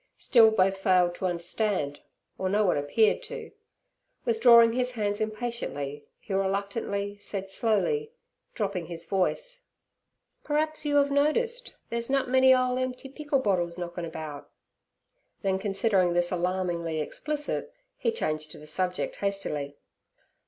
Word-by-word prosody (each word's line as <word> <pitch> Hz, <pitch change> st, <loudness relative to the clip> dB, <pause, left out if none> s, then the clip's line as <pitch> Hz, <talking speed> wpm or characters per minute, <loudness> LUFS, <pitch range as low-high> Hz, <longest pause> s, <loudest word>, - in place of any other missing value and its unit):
Still 230 Hz, -3 st, +6 dB
both 195 Hz, -3 st, +2 dB
failed 185 Hz, -2 st, +3 dB
to 185 Hz, -, -2 dB
understand, 175 Hz, -3 st, -1 dB, 0.4 s
or 190 Hz, -, 0 dB
no 210 Hz, +2 st, +2 dB
one 180 Hz, -, +3 dB
appeared 210 Hz, -, +2 dB
to; -, -, -8 dB, 0.7 s
withdrawing 235 Hz, 0 st, +6 dB
his 250 Hz, 0 st, 0 dB
hands 205 Hz, -3 st, -1 dB
impatiently, 215 Hz, -, -4 dB
he 200 Hz, -, -7 dB
reluctantly 200 Hz, +1 st, -2 dB
said 195 Hz, -1 st, -5 dB
slowly, 340 Hz, -, 0 dB, 0.4 s
dropping 195 Hz, -6 st, -2 dB
his 170 Hz, -1 st, -6 dB
voice: -, -, -2 dB, 0.8 s
'P'r'aps 310 Hz, +1 st, 0 dB
you 290 Hz, -1 st, +2 dB
'ave 280 Hz, 0 st, +3 dB
nodiced 465 Hz, -, +1 dB, 0.2 s
they's 235 Hz, +1 st, -2 dB
nut 275 Hz, -1 st, +1 dB
many 260 Hz, +1 st, +5 dB
ole 255 Hz, 0 st, +3 dB
emp'y 255 Hz, +1 st, -4 dB
pickle 295 Hz, -2 st, 0 dB
bottles 180 Hz, -8 st, 0 dB
knockin' 175 Hz, 0 st, -5 dB
about'; 155 Hz, -3 st, -7 dB, 0.9 s
then 190 Hz, -1 st, +1 dB
considering 195 Hz, -2 st, +2 dB
this 175 Hz, 0 st, +1 dB
alarmingly 175 Hz, -2 st, -1 dB
explicit, 300 Hz, -, -3 dB, 0.2 s
he -, -, 0 dB
changed 155 Hz, -, -2 dB
the 150 Hz, -, -12 dB
subject 180 Hz, +4 st, -2 dB
hastily. 150 Hz, -8 st, -3 dB
200 Hz, 130 wpm, -27 LUFS, 175-255 Hz, 0.9 s, Still